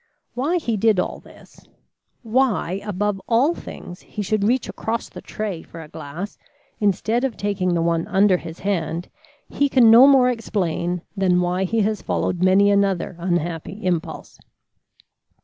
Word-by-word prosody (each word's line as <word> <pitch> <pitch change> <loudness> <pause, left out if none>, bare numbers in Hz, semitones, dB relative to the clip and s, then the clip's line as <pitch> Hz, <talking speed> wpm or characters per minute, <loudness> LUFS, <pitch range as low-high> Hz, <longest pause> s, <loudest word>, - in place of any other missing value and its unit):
Why 290 +8 0
he 235 -10 -2
did 215 -1 +3
all - - -2
this - - -18 0.6
why, 220 -6 0
above 205 -1 -2
all 250 +8 +3
things, 175 - -10
he 210 - -6
should 205 +1 0
reach 240 +3 +1
across 225 +1 -3
the - - -10
tray 205 -6 -5
for 165 - -12
a 160 - -9
glass 160 +7 -8 0.4
instead 220 +4 +1
of 265 -5 -2
taking 190 -3 -1
the 165 - +1
one 165 0 0
under 195 0 +3
his 165 -1 -9
hand, 175 -3 -2 0.4
he 285 0 0
can 245 -4 +6
no 245 +4 +9
more 260 -3 +5
explain 180 -6 -2
than 185 -3 +2
why 180 +1 0
he 225 +4 0
has 210 0 -1
followed 180 - -2
many 195 +2 +5
another 195 -3 +1
unhappy 175 +2 -3
impulse. 175 -3 -3
200 Hz, 155 wpm, -22 LUFS, 180-225 Hz, 0.6 s, no